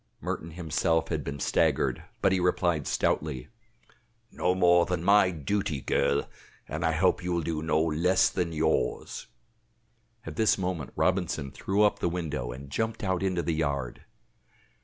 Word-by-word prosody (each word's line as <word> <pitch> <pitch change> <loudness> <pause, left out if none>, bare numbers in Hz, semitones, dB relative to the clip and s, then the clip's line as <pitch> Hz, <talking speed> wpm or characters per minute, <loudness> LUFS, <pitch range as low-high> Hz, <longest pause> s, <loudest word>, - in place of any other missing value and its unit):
Merton 80 - -4
himself 80 0 0
had - - -2
been 70 0 -5
staggered, - - +1 0.2
but - - +4
he 95 - +2
replied 90 -4 +1
stoutly: 70 -5 -1 0.8
"No 90 +1 0
more 85 -1 +4
than 90 -3 -2
my 100 0 +5
duty, 85 -1 -2
girl, 70 +1 +1 0.4
and - - -4
I 80 - +2
hope 90 +3 +2
you 90 - -2
will 85 -1 0
do 80 -1 -2
no 80 -1 +1
less 85 +4 +3
than 90 -3 -1
yours." 80 -1 -1 1.0
At - - -7
this 110 -1 +3
moment 90 -7 -3
Robinson 85 -7 0
threw 100 +8 0
up 105 - +2
the 85 - 0
window 75 -8 -3
and 70 +3 -9
jumped 110 +6 -2
out 95 -2 0
into 95 -3 0
the 85 - 0
yard. 70 -5 -2
85 Hz, 160 wpm, -28 LUFS, 75-90 Hz, 1.0 s, my